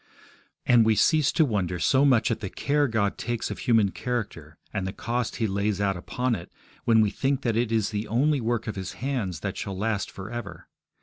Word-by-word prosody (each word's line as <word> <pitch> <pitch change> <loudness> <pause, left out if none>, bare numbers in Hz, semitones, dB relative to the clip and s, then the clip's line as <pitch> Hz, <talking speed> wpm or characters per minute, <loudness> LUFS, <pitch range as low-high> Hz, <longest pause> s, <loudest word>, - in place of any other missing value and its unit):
And 120 -2 +6
we 110 0 +3
cease 155 +5 +3
to 160 - +4
wonder 95 - -1
so 130 - +3
much 125 -4 +4
at 115 - -1
the 100 - -4
care 145 +6 +1
God 110 -4 0
takes 120 0 -2
of - - -6
human 115 -6 +3
character, 95 -12 -4 0.2
and 100 -3 -2
the - - -2
cost 120 0 -2
He 115 - 0
lays 100 0 0
out 100 -1 +1
upon 125 +8 -2
it, 85 -6 -5 0.3
when 115 -1 +5
we 105 -2 +2
think 135 +4 -1
that 115 -3 0
it 115 0 0
is 110 -2 +1
the 105 +1 -3
only 140 +5 +2
work 115 -1 -1
of 110 - -4
His 95 -2 -5
hands 110 - -3
that 100 -2 -4
shall 95 -1 -4
last 105 0 -1
for 95 +2 -8
ever. 120 -4 -7
110 Hz, 220 wpm, -26 LUFS, 100-125 Hz, 0.3 s, And